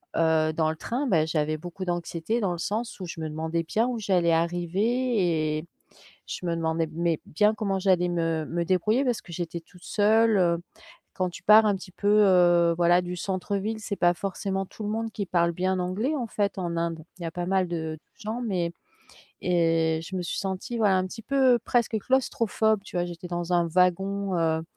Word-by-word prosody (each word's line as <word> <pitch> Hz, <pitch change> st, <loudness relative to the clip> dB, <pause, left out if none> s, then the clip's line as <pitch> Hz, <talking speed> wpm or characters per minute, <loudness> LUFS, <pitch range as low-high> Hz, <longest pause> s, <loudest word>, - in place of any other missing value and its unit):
heu, 160 Hz, -1 st, +2 dB
dans 155 Hz, -1 st, +1 dB
le 160 Hz, -, -2 dB
train, 255 Hz, -, -2 dB
bah, 160 Hz, -7 st, +3 dB
j'avais 155 Hz, -1 st, -1 dB
beaucoup 175 Hz, +4 st, -7 dB
d'anxiété 175 Hz, +5 st, -2 dB
dans 190 Hz, -5 st, 0 dB
le -, -, -5 dB
sens 215 Hz, +5 st, -3 dB
où -, -, -4 dB
je 165 Hz, -1 st, -7 dB
me 160 Hz, -, -3 dB
demandais 160 Hz, +2 st, -2 dB
bien 225 Hz, +8 st, 0 dB
où 240 Hz, -2 st, -2 dB
j'allais 180 Hz, -5 st, +2 dB
arriver. 175 Hz, -1 st, +1 dB
Et 155 Hz, -, -6 dB, 0.6 s
je -, -, -6 dB
me 170 Hz, 0 st, 0 dB
demandais, 160 Hz, 0 st, 0 dB
mais 170 Hz, -1 st, 0 dB
bien 210 Hz, +7 st, +2 dB
comment 200 Hz, -2 st, -1 dB
j'allais 185 Hz, -2 st, +2 dB
me 165 Hz, -2 st, -1 dB
me 170 Hz, 0 st, -2 dB
débrouiller. 210 Hz, +9 st, +2 dB
Parce 245 Hz, -3 st, 0 dB
que 175 Hz, -, -12 dB
j'étais 170 Hz, 0 st, -4 dB
toute 175 Hz, +2 st, -19 dB
seule. 205 Hz, -5 st, +3 dB, 0.6 s
Quand 185 Hz, -1 st, 0 dB
tu 175 Hz, -, -10 dB
pars 215 Hz, +1 st, +7 dB
un 200 Hz, -2 st, +2 dB
petit 185 Hz, 0 st, -10 dB
peu, 205 Hz, -, -2 dB
heu, 180 Hz, -5 st, +5 dB
voilà, 175 Hz, +1 st, +4 dB
du 180 Hz, 0 st, -5 dB
centre-ville, 200 Hz, +4 st, -2 dB
c'est 205 Hz, -2 st, -4 dB
pas 175 Hz, 0 st, +3 dB
forcément 195 Hz, +1 st, -3 dB
tout 215 Hz, -, -11 dB
le -, -, -2 dB
monde 225 Hz, +1 st, -2 dB
qui 200 Hz, -4 st, -4 dB
parle 170 Hz, -1 st, +2 dB
bien 185 Hz, +2 st, 0 dB
anglais 200 Hz, +11 st, -1 dB
en 245 Hz, -4 st, -2 dB
fait 205 Hz, -2 st, -1 dB
en 170 Hz, -2 st, -2 dB
Inde, 165 Hz, -2 st, -3 dB
il -, -, -10 dB
y -, -, -1 dB
a -, -, -3 dB
pas 175 Hz, +1 st, -4 dB
mal 185 Hz, -1 st, +1 dB
de 160 Hz, -2 st, -4 dB, 0.2 s
gens, 220 Hz, +3 st, -5 dB
mais 180 Hz, -7 st, -1 dB, 0.7 s
et 165 Hz, -2 st, +2 dB
je 185 Hz, +3 st, -8 dB
me -, -, -1 dB
suis -, -, -4 dB
sentie 195 Hz, +5 st, -3 dB
voilà 200 Hz, -4 st, +4 dB
un 185 Hz, -, 0 dB
petit 225 Hz, +4 st, -9 dB
peu 260 Hz, -1 st, +3 dB
presque 235 Hz, -2 st, +1 dB
claustrophobe, 220 Hz, -3 st, +1 dB
tu 190 Hz, -, -9 dB
vois? 175 Hz, 0 st, 0 dB
J'étais 175 Hz, 0 st, -8 dB
dans 175 Hz, 0 st, -2 dB
un 170 Hz, -1 st, +3 dB
wagon, 185 Hz, +2 st, +1 dB
heu, 160 Hz, -1 st, +1 dB
180 Hz, 205 wpm, -26 LUFS, 170-210 Hz, 0.7 s, pars